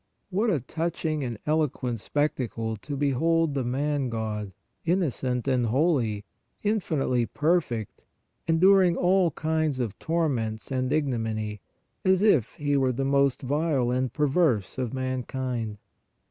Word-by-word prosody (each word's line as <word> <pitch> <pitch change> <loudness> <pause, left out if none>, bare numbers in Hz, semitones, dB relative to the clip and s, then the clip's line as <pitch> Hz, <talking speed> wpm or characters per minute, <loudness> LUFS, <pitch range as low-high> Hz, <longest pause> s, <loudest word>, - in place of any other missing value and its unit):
What 210 +5 +1
a 170 -8 +2
touching 160 +2 -2
and 120 -3 -4
eloquent 140 -6 0
spectacle 115 -4 -1
to 140 +7 -6
behold 150 +3 +2
the 135 -2 -1
Man 140 +2 -1
God, 110 -3 -3 0.3
innocent 140 -8 0
and 125 -3 +2
holy, 120 -6 +1 0.4
infinitely 155 - 0
perfect, 150 - 0 0.5
enduring 180 +1 +5
all 180 0 +3
kinds 155 -4 -1
of 115 -5 -3
tor 165 0 +1
ments 110 -4 -3
and 130 0 -1
ignominy, 115 -8 -1 0.4
as 190 +1 +3
if 155 - +3
He 145 -1 0
were 135 -2 +3
the 135 +2 -2
most 140 -1 +2
vile 140 -2 +1
and 130 -1 0
perverse 135 - +1
of 125 -3 -2
mankind. 130 -3 -3
135 Hz, 130 wpm, -26 LUFS, 120-160 Hz, 0.5 s, enduring